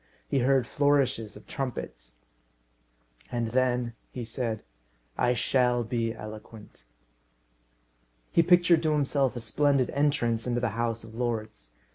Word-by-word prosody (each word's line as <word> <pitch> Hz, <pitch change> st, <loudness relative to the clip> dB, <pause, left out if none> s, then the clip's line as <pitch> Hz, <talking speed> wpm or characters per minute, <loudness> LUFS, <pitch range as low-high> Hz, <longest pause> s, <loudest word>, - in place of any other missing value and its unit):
He 140 Hz, -, +1 dB
heard 130 Hz, -1 st, +3 dB
flourishes 135 Hz, -6 st, +1 dB
of 105 Hz, -, -15 dB
trumpets. -, -, -5 dB, 1.1 s
"And 115 Hz, -2 st, -1 dB
then," 125 Hz, -1 st, +1 dB, 0.2 s
he 120 Hz, -2 st, -6 dB
said, 115 Hz, -2 st, -3 dB, 0.5 s
"I 125 Hz, 0 st, +2 dB
shall 125 Hz, -1 st, +2 dB
be 115 Hz, 0 st, -1 dB
eloquent." 110 Hz, -, -10 dB, 1.5 s
He -, -, +5 dB
pictured 175 Hz, -1 st, +5 dB
to 155 Hz, -2 st, +1 dB
himself 140 Hz, -3 st, +1 dB
a -, -, -3 dB
splendid 135 Hz, +3 st, +1 dB
entrance 125 Hz, -5 st, +1 dB
into 120 Hz, 0 st, +1 dB
the 120 Hz, -1 st, 0 dB
House 115 Hz, +1 st, -2 dB
of 110 Hz, -1 st, -12 dB
Lords. 110 Hz, -, -3 dB
120 Hz, 125 wpm, -28 LUFS, 115-135 Hz, 1.5 s, He